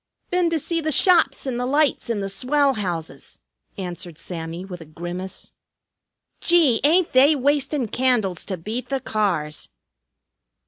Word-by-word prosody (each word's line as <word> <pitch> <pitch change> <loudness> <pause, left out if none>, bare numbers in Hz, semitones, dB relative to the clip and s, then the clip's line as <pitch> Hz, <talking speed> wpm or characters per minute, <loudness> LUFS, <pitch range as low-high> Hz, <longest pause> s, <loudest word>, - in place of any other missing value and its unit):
"Been 360 -1 +2
to 330 - 0
see 330 +2 -2
the 310 0 -1
shops 325 -4 +4
and 250 -3 -2
the 250 - -1
lights 290 -2 +1
in 220 -3 -1
the 195 - -2
swell 275 +7 +1
houses," 175 -8 -5 0.4
answered 175 -3 -6
Sammy 165 +1 -6
with 180 -3 -9
a - - -10
grimace. 175 +4 -7 0.9
"Gee! 325 -9 +3
Ain't 335 +4 +3
they 275 +4 +6
wastin' 285 -1 0
candles 220 -8 0
to 190 - -4
beat 215 +9 -5
the 270 -1 -1
cars!" 185 -11 -2
245 Hz, 145 wpm, -22 LUFS, 180-290 Hz, 0.9 s, they